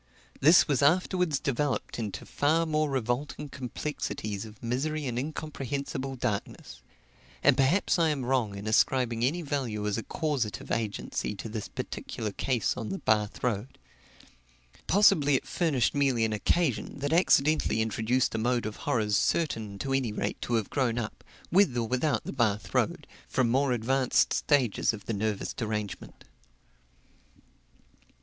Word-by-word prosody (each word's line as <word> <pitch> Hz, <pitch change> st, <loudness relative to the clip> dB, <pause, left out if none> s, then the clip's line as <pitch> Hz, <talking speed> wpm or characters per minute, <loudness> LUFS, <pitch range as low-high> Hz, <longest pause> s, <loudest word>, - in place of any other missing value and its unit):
This 160 Hz, +6 st, +6 dB
was 145 Hz, -3 st, +1 dB
afterwards 180 Hz, +1 st, +2 dB
developed 140 Hz, -1 st, -1 dB
into 105 Hz, -3 st, -4 dB
far 160 Hz, +3 st, +1 dB
more 155 Hz, -1 st, +1 dB
revolting 135 Hz, +3 st, -2 dB
complexities 120 Hz, -6 st, -4 dB
of 110 Hz, +1 st, -13 dB
misery 145 Hz, +6 st, -1 dB
and 120 Hz, -2 st, -2 dB
incomprehensible 140 Hz, -2 st, -4 dB
darkness; 105 Hz, -5 st, -4 dB, 0.6 s
and 145 Hz, -1 st, +6 dB
perhaps 145 Hz, +8 st, +2 dB
I 165 Hz, -1 st, +4 dB
am 140 Hz, -4 st, -2 dB
wrong 120 Hz, -6 st, 0 dB
in 100 Hz, -, -7 dB
ascribing 115 Hz, +1 st, +2 dB
any 165 Hz, +7 st, +1 dB
value 130 Hz, -8 st, -2 dB
as 105 Hz, +1 st, 0 dB
a -, -, -3 dB
causative 140 Hz, -10 st, -2 dB
agency 105 Hz, -1 st, -2 dB
to 105 Hz, -, -6 dB
this 110 Hz, -1 st, -5 dB
particular 105 Hz, -2 st, -5 dB
case 125 Hz, +2 st, 0 dB
on 115 Hz, -3 st, -5 dB
the 195 Hz, -, -3 dB
Bath 105 Hz, -, 0 dB
road 120 Hz, +1 st, -2 dB, 1.1 s
possibly 155 Hz, -8 st, +5 dB
it -, -, -1 dB
furnished 150 Hz, -9 st, +1 dB
merely 135 Hz, -5 st, +2 dB
an 110 Hz, -, -1 dB
occasion 125 Hz, +2 st, 0 dB
that 145 Hz, +2 st, -2 dB
accidentally 155 Hz, -7 st, +3 dB
introduced 110 Hz, +3 st, +1 dB
a 110 Hz, -, -1 dB
mode 120 Hz, +1 st, +1 dB
of 110 Hz, -1 st, -5 dB
horrors 105 Hz, -3 st, +1 dB
certain, 110 Hz, -12 st, 0 dB
to 135 Hz, +6 st, -2 dB
any 130 Hz, -4 st, +1 dB
rate, 105 Hz, -, -3 dB
to 120 Hz, -, -1 dB
have 110 Hz, -3 st, -1 dB
grown 125 Hz, -4 st, 0 dB
up, 115 Hz, -3 st, -5 dB, 0.3 s
with 175 Hz, -9 st, +4 dB
or 115 Hz, -1 st, 0 dB
without 130 Hz, +5 st, 0 dB
the -, -, -6 dB
Bath 110 Hz, -6 st, 0 dB
road, -, -, 0 dB, 0.2 s
from 125 Hz, -3 st, +1 dB
more 135 Hz, +2 st, +2 dB
advanced 125 Hz, +2 st, +2 dB
stages 130 Hz, -7 st, +2 dB
of 105 Hz, -, -9 dB
the 115 Hz, -, -2 dB
nervous 105 Hz, 0 st, -2 dB
derangement. 105 Hz, -3 st, -5 dB
125 Hz, 150 wpm, -28 LUFS, 110-145 Hz, 1.1 s, This